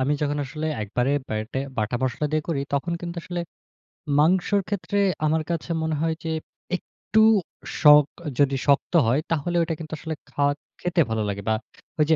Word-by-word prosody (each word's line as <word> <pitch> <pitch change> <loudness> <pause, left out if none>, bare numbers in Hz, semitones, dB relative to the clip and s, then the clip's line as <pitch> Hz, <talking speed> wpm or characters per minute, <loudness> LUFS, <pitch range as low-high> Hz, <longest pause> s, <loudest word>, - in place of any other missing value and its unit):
আমি 135 +3 +2
যখন 145 0 0
আসলে 155 +4 -4 0.2
একবারে 125 +6 0 0.2
ব্যাটে, 110 +4 -3 0.2
বাটা 115 +2 0
মসলা 130 +3 0
দিয়ে 155 - +1
করি, 145 -4 0
তখন 140 +5 0
কিন্তু 170 0 -5
আসলে 175 -1 -4 0.8
মাংসর 185 +5 +3
ক্ষেত্রে 205 0 -2 0.3
আমার 155 +1 +2
কাছে 170 0 -3
মনে 160 -1 0
হয় 165 0 +1
যে 165 - -3 0.5
একটু 215 +3 -2 0.6
শখ, 150 -1 +9 0.3
যদি 140 -1 +4
শক্ত 140 +4 +3
হয় 130 +6 +3
তাহলে 165 +2 0
ঐটা 165 - -1
কিন্তু 160 -1 -7
আসলে 160 0 -4 0.2
খাওয়া, 145 -1 +2 0.3
খেতে 175 -1 +1
ভালো 110 -1 0
লাগে 100 0 -3
বা 110 - +3 0.4
ওই 150 - +5
যে 160 - +6
150 Hz, 175 wpm, -24 LUFS, 135-165 Hz, 0.8 s, শখ